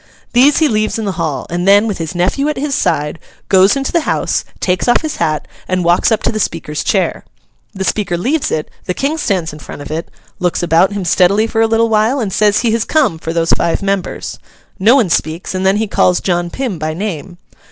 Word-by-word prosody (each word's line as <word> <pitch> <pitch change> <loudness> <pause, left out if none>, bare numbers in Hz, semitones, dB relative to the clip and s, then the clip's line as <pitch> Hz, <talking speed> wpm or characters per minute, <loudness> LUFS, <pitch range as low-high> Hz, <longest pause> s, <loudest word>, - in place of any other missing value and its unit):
These 270 +4 +5
he 315 - +4
leaves 215 -3 0
in 220 - -3
the 200 - -1
hall; 160 -7 -3
and 175 +2 -1
then, 205 +2 +6
with 205 -5 -3
his 165 +2 -4
nephew 190 +12 0
at 300 - -3
his 280 +1 -2
side, 150 - 0 0.3
goes 190 +3 +5
into 275 -1 -2
the 340 - +2
House, - - -1 0.2
takes 180 +4 0
off 240 - +3
his 310 - -3
hat, 155 -2 -1 0.2
and 185 -1 0
walks 170 +6 +3
up 220 - +1
to - - +1
the 215 - -3
Speaker's 160 -5 -3
chair. - - 0 0.5
The 190 - -3
Speaker 190 -3 -1
leaves 275 - 0
it, 155 - -3
the 180 - -2
King 300 +4 -1
stands 180 - -1
in 150 - -10
front 145 - -9
of 145 - -9
it, 160 +2 -4 0.3
looks 180 -1 0
about 175 +3 +3
him 200 -3 -3
steadily 190 +5 +3
for 225 0 -1
a 225 - +4
little 225 +1 +2
while, 225 +5 +2
and 205 -6 -2
says 210 0 +3
he 235 -2 +1
has 225 0 +1
come 265 - +1
for 165 - -4
those 165 0 0
five 170 +3 +1
members. 195 -2 -3 0.4
No 220 +7 +5
one 225 -11 +2
speaks, 160 +3 -1
and 190 0 0
then 195 +2 +3
he 220 - 0
calls 180 -3 +2
John 175 -2 -1
Pym 230 -4 -4
by 155 +1 -3
name. 175 -2 -5
195 Hz, 230 wpm, -15 LUFS, 170-225 Hz, 0.5 s, then